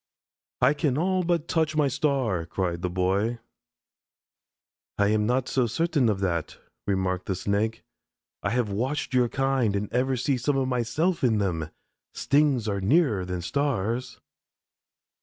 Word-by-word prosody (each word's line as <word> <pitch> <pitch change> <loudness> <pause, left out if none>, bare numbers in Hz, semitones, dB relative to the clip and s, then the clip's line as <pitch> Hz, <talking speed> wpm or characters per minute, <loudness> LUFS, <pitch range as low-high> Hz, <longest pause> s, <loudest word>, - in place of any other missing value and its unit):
"I 135 +3 +6
can 145 -3 0
all 185 +3 +1
but 170 -2 0
touch 160 -3 0
my 150 -2 +3
star," 130 - 0
cried 85 -1 -2
the 90 - -1
Boy. 95 +6 0 1.6
"I 100 0 +3
am 105 0 +2
not 125 +1 +1
so 125 -3 +1
certain 145 0 +1
of 100 -2 -1
that," 85 -5 -2 0.3
remarked 95 -2 -1
the 95 - -1
Snake. 105 +4 -1 0.6
"I 100 - -1
have 115 -2 0
watched 130 +8 -2
your 125 -2 +3
kind 135 -6 +1
and 100 0 -3
ever 130 +1 +1
see 130 +2 0
some 135 +3 0
of 135 -1 +1
myself 135 +9 0
in 115 -4 +3
them. 85 -6 -1 0.5
Stings 140 -6 +2
are 100 -2 -1
nearer 110 - +2
than 90 -1 -4
stars." 125 -1 -1
120 Hz, 150 wpm, -26 LUFS, 100-140 Hz, 1.6 s, I